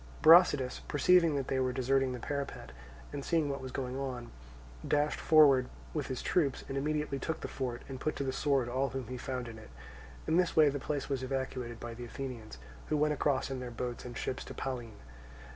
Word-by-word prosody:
Brasidas, 155 -6 +6
perceiving 165 +1 +4
that 135 -2 -2
they 130 - 0
were 130 -1 +1
deserting 130 +1 +1
the 125 - -4
parapet, 140 - -4 0.4
and 140 -1 -4
seeing 160 -2 +1
what 140 - -4
was 130 -1 -6
going 130 0 -3
on, 125 -3 -5 0.6
dashed 150 +1 +1
forward 140 -5 +6 0.2
with 150 -3 -2
his 130 -2 -4
troops, 145 -7 +1
and 135 - -5
immediately 150 0 -1
took 160 +4 -3
the - - -3
fort, 125 -3 -4
and 130 -2 -7
put 155 - -1
to - - -2
the 130 -1 -2
sword 135 -3 +1
all 130 +3 0
whom 130 +1 -4
he 130 - -4
found 125 -1 -4
in 110 -1 -9
it. 110 - -13 0.6
In 160 - +2
this 180 -2 +2
way 155 -2 +7
the 140 0 -3
place 145 0 -3
was 135 -3 -2
evacuated 130 -3 -3
by 120 -1 -6
the 120 +1 -7
Athenians, 120 - -7 0.3
who 155 - +1
went 150 0 +2
across 140 -2 0
in 130 - -3
their 125 -1 -5
boats 120 +1 -5
and 120 -1 -7
ships 130 - -3
to - - -9
Pallene. 120 -5 -5
135 Hz, 210 wpm, -32 LUFS, 125-145 Hz, 0.6 s, way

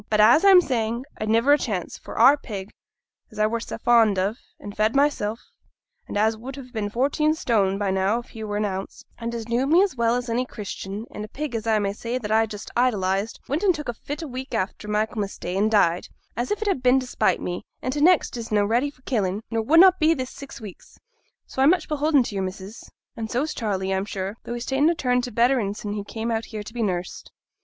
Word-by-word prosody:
But, 215 - +1
as 235 - +6
I'm 385 -2 +8
saying, 235 -4 -2
I'd 215 - -2
niver 230 +6 +4
a 295 - +4
chance; 195 -8 -3
for - - -10
our 260 +5 +7
pig, 205 -8 -7 0.6
as 215 - -15
I 215 - +3
were 230 +2 0
sa 230 - -6
fond 225 -4 +4
on, 195 +4 0 0.2
and 205 0 -9
fed 215 +3 +1
mysel', 275 -7 +1 0.7
and - - -4
as 220 +2 +2
would 255 +5 -8
ha' 260 -3 -10
been 210 -2 -2
fourteen 285 +7 +1
stone 200 -9 +1
by 200 -1 -1
now 190 +3 +1
if 240 - -8
he 220 -2 -8
were 205 -1 -3
an 210 - 0
ounce, 190 -1 -5 0.2
and 235 0 -4
as 230 -1 -5
knew 240 +3 +1
me 340 +6 +5
as 395 -8 -1
well 235 -1 +2
as 245 0 -3
any 235 +2 0
Christian, 210 -2 -6
and 210 - -6
a - - -6
pig, 290 +3 -5
as 225 -1 -3
I 220 -1 +3
may 200 -1 -1
say, 235 +4 -3
that 215 -4 -5
I 225 +1 +3
just 210 -1 -8
idolized, 205 -4 0
went 290 +5 -1
and 385 -4 +3
took 300 -1 -6
a 240 - -2
fit 290 +7 -6
a - - -5
week 260 -1 -6
after 210 0 -3
Michaelmas 210 -1 -2
Day, 180 - -4
and 205 +3 +2
died, 180 -5 +2 0.3
as 240 +2 -2
if 420 +1 -1
it - - -4
had 380 -10 0
been 255 +1 +4
to 260 - -5
spite 250 - +1
me; 175 0 -4 0.2
and 255 - -1
t' 295 - -2
next 350 -3 +4
is 230 -1 -6
na' 205 -1 +3
ready 235 +7 +1
for 260 -2 -21
killing, 205 -5 -1
nor 225 0 0
wunnot 340 +9 +6
be 320 +1 +4
this 260 -2 -4
six 280 - -10
week. 210 -5 -10 0.6
So 265 - -4
I'm 275 - +6
much 355 -1 +2
beholden 300 -2 +2
to 225 - -6
your 195 -1 -1
missus, 190 +3 -7 0.3
and 225 -1 -5
so's 285 +7 -1
Charley, 195 -4 -2
I'm 190 +1 -1
sure; 195 +1 -5
though 240 - -4
he's 240 0 -5
ta'en 275 +4 +2
a 340 - +1
turn 250 -5 +1
to 245 0 -5
betterin' 235 -4 +2
sin' 205 -1 -5
he 205 -1 -4
came 225 +3 -4
out 225 0 -1
here 215 -2 -6
to 215 - -11
be 240 - -3
nursed.' 180 -4 -3
230 Hz, 250 wpm, -24 LUFS, 210-265 Hz, 0.7 s, I'm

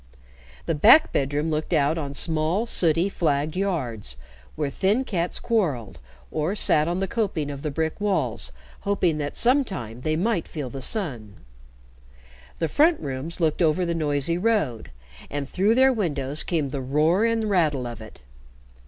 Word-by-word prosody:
The - - 0
back 230 - +6
bedroom 145 +3 0
looked 155 +3 -2
out 150 0 +2
on 140 -4 -4
small, 160 +7 0
sooty, 170 -5 +3
flagged 155 -5 -1
yards, 125 - -2 0.4
where 150 -2 -2
thin 200 - +1
cats 180 -8 -2
quarreled, 135 - -1 0.3
or 160 +6 -1
sat 155 -6 +3
on 175 +2 -1
the 195 - 0
coping 180 -11 -2
of 140 -1 -7
the 150 - -2
brick 160 +6 -3
walls 160 - -1 0.3
hoping 180 -6 0
that 145 -1 -4
sometime 195 - 0
they 155 +3 0
might 190 +1 0
feel 145 -6 -6
the 135 - -6
sun; 130 - -3 1.2
the 165 - 0
front 315 - +3
rooms 140 +4 -5
looked 160 0 +1
over 170 +2 +2
the 170 - -1
noisy 155 +1 0
road, 195 - 0 0.4
and 145 -1 -4
through 200 +8 +2
their 265 +1 +5
windows 150 - 0
came 155 -5 -1
the 135 0 -4
roar 155 +9 +2
and 230 -1 +1
rattle 160 -11 +1
of 120 -2 -7
it. 110 - -13
160 Hz, 160 wpm, -24 LUFS, 140-195 Hz, 1.2 s, back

